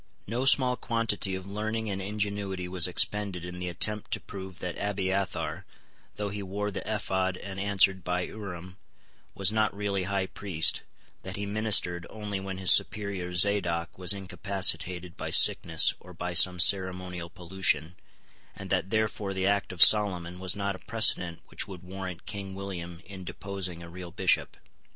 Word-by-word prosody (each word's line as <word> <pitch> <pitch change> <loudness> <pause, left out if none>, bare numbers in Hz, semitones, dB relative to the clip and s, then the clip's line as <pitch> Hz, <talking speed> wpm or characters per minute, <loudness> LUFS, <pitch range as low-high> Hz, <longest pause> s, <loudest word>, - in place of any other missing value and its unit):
No 120 +5 -3
small 130 -2 +4
quantity 115 -4 0
of 95 0 -7
learning 110 +3 -4
and 100 -2 -4
ingenuity 100 -2 -4
was 90 -1 +2
expended 95 -1 +1
in 90 0 -8
the 90 0 -4
attempt 105 +4 0
to - - -1
prove 95 -1 -10
that 90 -2 -5
Abiathar, 100 -1 -3 0.5
though 105 -1 -4
he 100 +1 -6
wore 100 +2 -4
the - - -5
ephod 95 -3 -2
and 95 0 -8
answered 95 -2 +2
by 90 +1 -1
Urim, 90 -2 -8 0.6
was 95 0 +3
not 110 -2 0
really 100 -2 -2
High 100 0 -1
Priest, 95 -4 +2 0.4
that 95 +1 -7
he 100 -1 -4
ministered 100 -5 +3
only 105 -2 -5
when 95 -1 -6
his 95 -1 +6
superior 100 -4 +2
Zadoc 90 -3 +1
was 90 -1 +2
incapacitated 95 -2 0
by - - -5
sickness - - +5
or 90 - -14
by 90 +1 -5
some 90 +1 +5
ceremonial 90 -2 +2
pollution, 90 -1 0 0.6
and - - -9
that 95 - 0
therefore 105 -2 -2
the 95 0 -1
act 100 0 0
of 90 -2 +6
Solomon 90 -4 +4
was 95 0 0
not 100 -1 -3
a - - -12
precedent 90 -7 +3
which - - -3
would 95 -2 -10
warrant 90 -1 -8
King 100 -2 -6
William 90 -3 -7
in 95 -1 -10
deposing 90 -1 -6
a - - -10
real 90 +1 -9
Bishop. 95 +1 0
95 Hz, 165 wpm, -27 LUFS, 90-100 Hz, 0.6 s, his